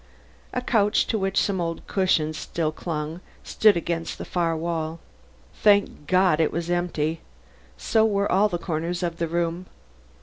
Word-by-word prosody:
A 250 - -2
couch 210 -4 +2
to 220 - -1
which 195 0 +1
some 190 -3 0
old 165 -1 -4
cushions 160 -5 +1
still 155 0 -2
clung 155 +1 -5 0.2
stood 215 -4 +4
against 170 -1 -3
the - - -6
farther 170 -2 0
wall. 165 0 -3 0.5
Thank 200 -8 +2
God! 185 -4 +3
it 160 - +2
was 170 +1 -3
empty; 165 -2 -1 0.6
so 220 -1 +2
were 200 -2 +1
all 205 +3 +4
the 175 - -2
corners 170 +1 -3
of 170 -1 -2
the 170 -1 -1
room. 170 +2 -2
170 Hz, 160 wpm, -24 LUFS, 165-195 Hz, 0.6 s, stood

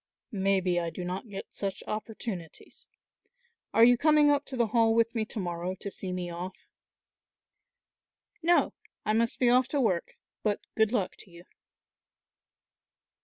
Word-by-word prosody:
"Maybe 190 -3 +1
I 170 -1 -2
do 175 +2 -6
not 185 +6 -4
get 195 - -6
such 195 -1 -4
opportunities; 215 -5 -6 0.8
are 225 - +5
you 245 0 +6
coming 300 0 +5
up 285 0 +1
to 265 - -6
the 235 - +3
Hall 225 -1 +4
with 230 0 +3
me 225 -2 -1
to 225 - -9
morrow 175 0 -3
to 200 +2 -7
see 190 -1 -5
me 180 -1 -3
off?" 175 +2 -6 1.9
"No, 345 +1 +3 0.3
I 215 - +2
must 230 +1 +1
be 250 - +2
off 250 +1 +4
to 290 - -1
work, 190 -9 0 0.2
but 210 -2 0
good 220 -1 +2
luck 205 -7 0
to - - -14
you." 170 0 -14
210 Hz, 155 wpm, -29 LUFS, 180-235 Hz, 1.9 s, you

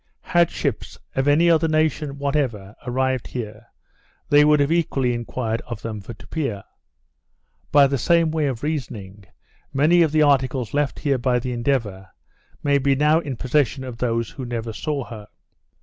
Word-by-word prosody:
Had 175 -1 +2
ships, - - -3 0.2
of 135 +1 0
any 155 +4 +4
other 165 -1 +4
nation 155 -2 0
whatever, 130 -8 -2
arrived 130 0 0
here, 110 -1 -7 0.6
they 145 0 +6
would 150 0 +4
have 145 +2 +2
equally 140 -7 +1
enquired 120 -1 -3
of 115 -3 -7
them 110 -2 -5
for 115 +4 -9
Tupia. 125 -11 -4 1.1
By 145 -1 +7
the 135 -1 0
same 170 +3 +3
way 155 -2 0
of 130 -3 -4
reasoning, 110 -10 -5 0.5
many 155 +6 +4
of 160 -3 +3
the 155 0 +4
articles 130 -5 +1
left 145 -1 0
here 140 -3 +1
by 125 0 +1
the 125 +1 -3
Endeavour, 115 -7 -2 0.5
may 140 -1 +3
be 140 0 +2
now 150 +3 +3
in 140 -7 -5
possession 130 0 0
of 125 -3 -7
those 115 -2 -1
who 135 - -7
never 115 -2 -4
saw 145 +2 -3
her. 110 -3 -10
135 Hz, 165 wpm, -22 LUFS, 120-150 Hz, 1.1 s, By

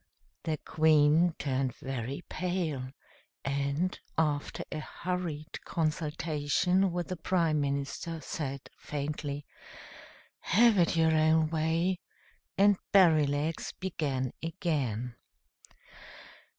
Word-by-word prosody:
The 155 -1 0
Queen 155 +2 +4
turned 130 -2 -1
very 135 +3 -4
pale, 170 -8 -2 0.6
and, 140 +6 -1 0.2
after 150 -3 0
a - - -3
hurried 170 -2 -4
consultation 160 +3 0
with 175 0 -3
the 185 - -2
Prime 165 -3 +1
Minister, 140 +4 -2
said 140 -3 -4 0.2
faintly, 145 0 -4 0.9
"Have 220 +1 +4
it 170 0 +3
your 160 -1 +4
own 160 0 +3
way;" 165 +3 +1 0.6
and 200 0 +5
Berrylegs 155 -4 +3
began 140 -9 -2
again. 140 - -2
155 Hz, 90 wpm, -30 LUFS, 145-175 Hz, 0.9 s, and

